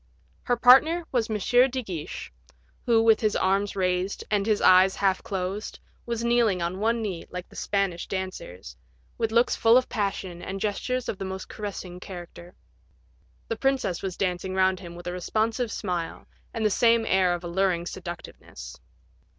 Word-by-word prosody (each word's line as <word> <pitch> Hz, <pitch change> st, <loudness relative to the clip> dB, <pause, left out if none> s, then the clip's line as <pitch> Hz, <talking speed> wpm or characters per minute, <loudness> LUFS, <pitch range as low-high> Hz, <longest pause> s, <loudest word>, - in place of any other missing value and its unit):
Her 245 Hz, -, +1 dB
partner 285 Hz, +8 st, +6 dB
was 240 Hz, -3 st, 0 dB
M. 215 Hz, -, 0 dB
de 250 Hz, +4 st, +3 dB
Guiche, 170 Hz, -, -6 dB, 0.5 s
who, 225 Hz, -2 st, +4 dB
with 225 Hz, -1 st, +5 dB
his 215 Hz, -2 st, +1 dB
arms 195 Hz, +2 st, +1 dB
raised, 185 Hz, 0 st, -1 dB
and 205 Hz, -1 st, +1 dB
his 215 Hz, -2 st, +2 dB
eyes 185 Hz, +1 st, +6 dB
half 190 Hz, -2 st, +1 dB
closed, 195 Hz, +2 st, -4 dB, 0.3 s
was 235 Hz, -1 st, -2 dB
kneeling 235 Hz, -5 st, +3 dB
on 175 Hz, +2 st, -3 dB
one 225 Hz, +2 st, +1 dB
knee, 185 Hz, -6 st, -4 dB
like 180 Hz, 0 st, -7 dB
the -, -, -17 dB
Spanish 195 Hz, -4 st, -1 dB
dancers, 185 Hz, -, -6 dB, 0.4 s
with 225 Hz, -1 st, 0 dB
looks 235 Hz, +2 st, +3 dB
full 230 Hz, +2 st, +5 dB
of 255 Hz, -, +1 dB
passion, 195 Hz, -5 st, -3 dB
and 195 Hz, +1 st, -5 dB
gestures 245 Hz, +5 st, -2 dB
of 195 Hz, -, -4 dB
the 195 Hz, -, -3 dB
most 190 Hz, 0 st, -6 dB
caressing 195 Hz, -4 st, -6 dB
character. 175 Hz, -1 st, -10 dB, 0.9 s
The 225 Hz, -, -3 dB
princess 265 Hz, -9 st, 0 dB
was 185 Hz, -2 st, -4 dB
dancing 185 Hz, 0 st, -2 dB
round 190 Hz, -1 st, +2 dB
him 170 Hz, -2 st, -10 dB
with 175 Hz, -, -10 dB
a 175 Hz, -, -3 dB
responsive 220 Hz, +6 st, -1 dB
smile, 175 Hz, -6 st, -4 dB, 0.3 s
and 225 Hz, -2 st, -2 dB
the 210 Hz, -, +3 dB
same 230 Hz, +1 st, +3 dB
air 185 Hz, -3 st, +3 dB
of 175 Hz, -, -8 dB
alluring 175 Hz, 0 st, 0 dB
seductiveness. 170 Hz, -, -9 dB
195 Hz, 165 wpm, -26 LUFS, 180-225 Hz, 0.9 s, partner